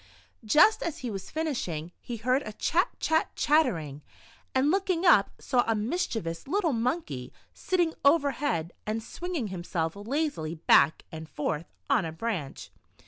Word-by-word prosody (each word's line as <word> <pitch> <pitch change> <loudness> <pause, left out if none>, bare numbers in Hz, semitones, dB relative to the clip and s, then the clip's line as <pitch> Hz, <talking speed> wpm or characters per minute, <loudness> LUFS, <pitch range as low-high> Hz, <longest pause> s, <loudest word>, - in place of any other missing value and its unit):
Just 305 - +5
as 335 - -3
he 240 - -2
was 195 -2 -6
finishing, 240 - -3
he 240 -2 -6
heard 250 +5 +1
a 215 - -7
"chat, 340 - +1
chat, 320 0 +1
chattering," 170 - +1 0.5
and 270 +3 +3
looking 375 -2 0
up 205 - +6
saw 250 -3 +2
a 225 - +2
mischiev 225 - -2
ous 165 +6 -5
little 345 -1 +1
monkey 230 - -2 0.2
sitting 350 -3 0
overhead, 280 - +2
and 220 +1 -2
swinging 340 - -4
himself 170 -2 -3
lazily 220 - -2
back 155 -2 +4
and 160 0 -8
forth 150 +2 -3 0.2
on - - +3
a 165 - -4
branch. 165 -5 -4
230 Hz, 145 wpm, -28 LUFS, -, 0.5 s, up